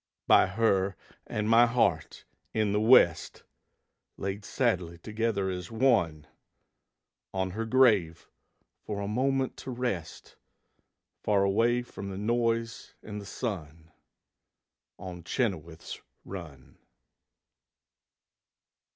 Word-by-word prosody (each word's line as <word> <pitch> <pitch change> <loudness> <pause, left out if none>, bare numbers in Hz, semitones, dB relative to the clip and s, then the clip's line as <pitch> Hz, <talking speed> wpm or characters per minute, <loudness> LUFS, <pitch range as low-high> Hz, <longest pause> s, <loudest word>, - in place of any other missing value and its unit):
By - - +6
her 95 -1 +1 0.3
and 105 0 -2
my 115 +2 +6
heart 100 -9 0 0.3
in 110 -2 +1
the 105 - +1
West, 110 -8 +4 0.7
Laid 100 +1 -4
sadly 90 -9 -1
together 110 +1 -2
as 90 -2 -5
one; 110 - +1 1.1
On 95 -1 -1
her 110 +4 -3
grave 105 -10 +3 0.5
for 105 -1 -5
a 100 - -3
moment 130 +4 0
to - - -8
rest, 120 -10 -4 0.8
Far 100 -2 +2
away 115 +5 +2
from 100 -4 -8
the 95 - -6
noise 115 +1 -1
and 105 -1 -6
the 100 - -11
sun, 80 - -6 1.1
On 90 -2 -8
Chenoweth's 85 - -3 0.2
Run. 80 -9 -10
100 Hz, 100 wpm, -29 LUFS, 90-115 Hz, 1.1 s, By